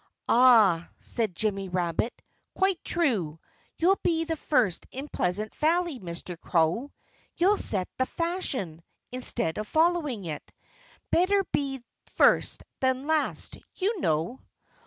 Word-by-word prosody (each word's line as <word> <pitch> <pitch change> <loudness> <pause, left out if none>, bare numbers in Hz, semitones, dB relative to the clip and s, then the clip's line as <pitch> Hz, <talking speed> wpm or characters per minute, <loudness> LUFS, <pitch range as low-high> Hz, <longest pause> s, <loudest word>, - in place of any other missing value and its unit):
"Ah!" 220 -9 +5
said 220 -6 -3
Jimmy 195 -1 -1
Rabbit. 180 +5 -2 0.3
"Quite 385 -2 +1
true! 210 - 0 0.4
You'll 375 +4 +3
be 325 -1 +1
the 325 0 -2
first 250 - 0
in 270 +3 -6
Pleasant 210 -2 -2
Valley, 330 -2 +1
Mr. 170 -1 -7
Crow. 175 - +1 0.5
You'll 390 +4 +3
set 185 -3 +1
the 260 - +2
fashion, 290 - -3 0.3
instead 240 -7 -1
of 215 - -4
following 315 - +1
it. 155 -3 -6 0.6
Better 390 +3 +3
be 270 -3 -1 0.3
first - - +3 0.2
than 260 +1 +1
last, 315 0 -1 0.2
you 400 +2 -1
know!" 160 +10 0
255 Hz, 120 wpm, -27 LUFS, -, 0.6 s, Ah